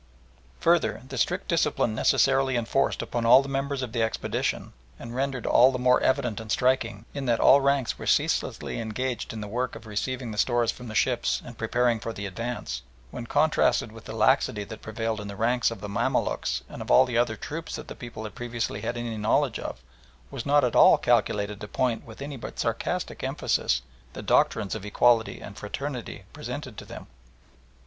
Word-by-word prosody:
Further, 170 -6 +2
the 135 - -7
strict 180 +10 0
discipline 150 -9 +1
necessarily 135 +3 +3
enforced 120 +4 0
upon 120 - -3
all 125 +4 +7
the - - -7
members 135 0 -2
of 125 - -5
the 120 -1 -1
expedition, 110 0 -2 0.2
and 115 - -8
rendered 130 -1 -2
all 125 +2 +6
the 130 - -2
more 125 0 +3
evident 130 -5 +1
and 110 -1 -7
striking, 120 -4 +1
in 140 -2 -4
that 115 -1 +2
all 140 - +7
ranks 140 -3 +1
were - - -6
ceaselessly - - 0
engaged 115 +2 -3
in 110 - -6
the 105 - -5
work 125 +4 -2
of - - -10
receiving 120 +3 -3
the 105 - -4
stores 120 -2 +2
from 125 - -10
the 110 - -7
ships - - +1
and - - -11
preparing 120 -2 +1
for 115 +1 -5
the 100 - -6
advance, 100 - -4 0.3
when 120 - -7
contrasted 150 -6 +2
with 115 0 -13
the 110 - -7
laxity 110 -2 +2
that 110 +2 -9
prevailed 110 0 -3
in 105 - -7
the 100 - -7
ranks 120 +3 +2
of 115 -4 -8
the 105 - -5
Mamaluks 100 0 -1
and - - -9
of - - -7
all 130 +1 +6
other 120 -1 +2
troops 160 +8 -6
that - - -8
the - - -7
people 120 -3 -8
had 110 - -7
previously 120 -3 -3
had 120 +2 -3
any 120 -2 -4
knowledge 105 +1 +1
of, - - -6 0.5
was 120 - -5
not 145 +1 +4
at 125 - 0
all - - +8
calculated 105 -3 +1
to 105 - -6
point 120 +2 -1
with 115 +4 -9
any 140 -1 -6
but - - -8
sarcastic - - -2
emphasis - - 0 0.3
the - - -7
doctrines 105 -3 +2
of - - -5
equality 115 +2 +2
and 100 -1 -10
fraternity 125 +4 -5
presented - - -6
to - - -10
them. - - -9
120 Hz, 195 wpm, -26 LUFS, 110-130 Hz, 0.5 s, all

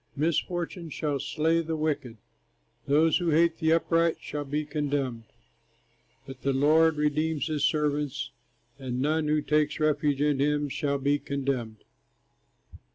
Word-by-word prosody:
Misfortune 170 +2 -2
shall 145 -2 -2
slay 165 +4 +1
the 165 0 -3
wicked, 150 -7 -2 0.7
Those 155 +5 +3
who 175 -2 0
hate 165 +1 +3
the 160 0 +2
upright 165 0 +2
shall 145 -1 -5
be 150 +2 -2
condemned; 145 -6 -2 1.0
But 135 -1 -10
the 140 - 0
Lord 155 +3 +4
redeems 150 +1 0
his 155 -3 -2
servants, 150 -2 -1 0.5
And 125 -2 -4
none 155 +3 +1
who 150 0 +1
takes 150 +1 +1
refuge 150 -2 +1
in 145 -1 +1
him 145 +1 +1
shall 140 +1 -1
be 140 +1 +1
condemned. 130 -7 -3
150 Hz, 135 wpm, -27 LUFS, 140-160 Hz, 1.0 s, Lord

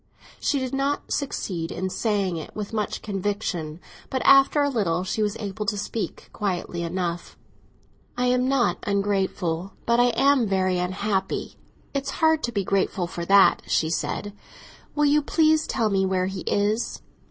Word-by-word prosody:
She 290 - +1
did 260 -1 -3
not 275 +1 -1
succeed 180 - -3
in 185 +1 -3
saying 200 -5 0
it 160 - -8
with 210 +1 -5
much 215 -1 -2
conviction, 195 -6 -3 0.3
but 260 - -2
after 275 +2 +6
a 285 - +2
little 180 -9 0
she 200 +3 -2
was 210 0 0
able 210 0 -4
to 210 -1 0
speak 210 +2 -4
quietly 180 -4 -2
enough. 170 0 -3 0.8
"I 250 - +1
am 250 0 +2
not 270 -3 +2
ungrateful, 195 -3 -1
but 235 0 +3
I 245 - +5
am 270 -2 +4
very 185 -2 +1
unhappy. 190 +2 -2 0.4
It's 275 0 -2
hard 320 -1 +3
to 240 - -4
be 200 -4 -1
grateful 190 -1 0
for 170 0 -5
that," 195 +1 +6
she 160 0 +1
said. 205 +4 -2 0.6
"Will 295 0 +3
you 295 +1 +4
please 315 +1 +2
tell 225 -4 0
me 195 -1 +2
where 185 -1 +1
he 190 -1 -4
is?" 210 +3 0
205 Hz, 165 wpm, -24 LUFS, 185-250 Hz, 0.8 s, after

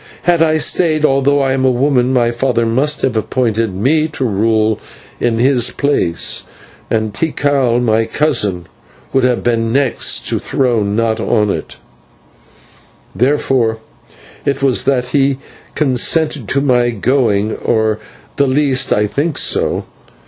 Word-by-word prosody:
Had 175 -2 +2
I 155 -1 +3
stayed, 155 -1 +1
although 140 0 +2
I 135 -1 +1
am 135 0 -1
a 130 - +4
woman, 130 0 +1
my 120 -2 +2
father 120 -1 0
must 135 +6 0
have 130 -3 0
appointed 115 -2 -1
me 150 +10 +1
to 150 -4 -4
rule 110 0 +1 0.4
in 115 -1 0
his 125 0 +2
place, 140 - -1 0.5
and 110 -2 -1
Tikal, 140 -3 0
my 115 -2 +1
cousin, 105 - 0 0.5
would 135 - +2
have 125 -1 +1
been 115 -1 0
next 135 -1 0
the - - -1
throne, 115 -7 0
not 115 0 0
on 105 -2 +1
it; - - -5 1.4
therefore 125 -3 +1 0.7
it 140 -1 -2
was 135 -3 +1
that 125 -2 0
he 135 0 +1 0.4
consented 145 -1 +1
to 140 - +1
my 125 -3 +2
going, 110 -2 0
or 110 -1 0
at 105 - -5 0.4
the 140 - +2
least 135 -1 +1
I 105 - +2
think 140 +9 -2
so. - - 0
125 Hz, 140 wpm, -15 LUFS, 115-140 Hz, 1.4 s, a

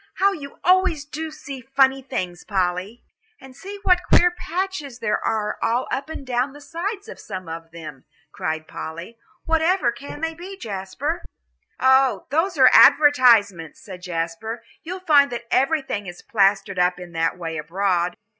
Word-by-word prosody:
"How 395 +1 +3
you 285 -7 -8
always 365 -5 +3
do 315 +2 -5
see 280 -3 -9
funny 270 +1 +2
things, 185 -10 -5
Polly." 190 +3 -2 0.4
"And 265 -2 -14
see 395 +7 -8
what 360 -2 +4
queer 355 0 +6
patches 350 -7 -4
there 210 -3 -1
are 210 -1 -1
all 245 +3 0
up 275 +4 -3
and 300 -3 -7
down 255 +2 -1
the 290 - -12
sides 385 +8 -5
of 475 - -10
some 185 -4 -7
of 165 0 -7
them," 155 -5 -10 0.3
cried 155 0 -4
Polly. 170 +9 -8 0.3
"Whatever 325 -4 +2
can 280 +4 -9
they 325 0 -1
be, 365 +4 -9
Jasper?" 230 - -4 0.6
"Oh, 265 0 +4
those 330 +3 +1
are 260 - +7
the - - +6
advertisements," 235 - +5
said 185 -4 -10
Jasper. 180 +6 -4 0.2
"You'll 365 +3 -6
find 290 -6 +4
that 235 -1 -5
everything 270 - 0
is 175 0 -9
plastered 195 -2 +1
up 180 0 +2
in 180 -1 -9
that 165 +1 -1
way 165 -2 -5
abroad." 175 +2 -1
250 Hz, 165 wpm, -22 LUFS, -, 0.6 s, are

